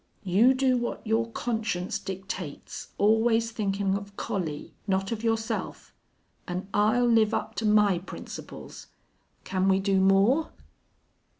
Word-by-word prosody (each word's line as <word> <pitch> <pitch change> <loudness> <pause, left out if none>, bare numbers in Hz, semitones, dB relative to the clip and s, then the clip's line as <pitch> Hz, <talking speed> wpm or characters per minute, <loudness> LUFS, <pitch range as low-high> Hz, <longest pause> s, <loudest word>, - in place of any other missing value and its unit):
You 215 +8 +4
do 260 -1 +2
what 240 0 -4
your 225 +1 +1
conscience 220 -6 -2
dictates, 190 -5 -6
always 225 +2 +3
thinkin' 200 -3 -1
of 200 0 -5
Collie 160 -7 -4
not 195 +1 0
of 225 -1 -3
yourself! 225 0 -2 0.5
An' 180 +2 -4
I'll 215 +4 +3
live 225 -2 +4
up - - -3
to 220 - 0
my 210 -4 +4
principles. 180 - -9 0.6
Can 185 0 0
we 190 0 +4
do 195 0 +2
more?" 200 +11 +3
210 Hz, 125 wpm, -27 LUFS, 195-230 Hz, 0.6 s, You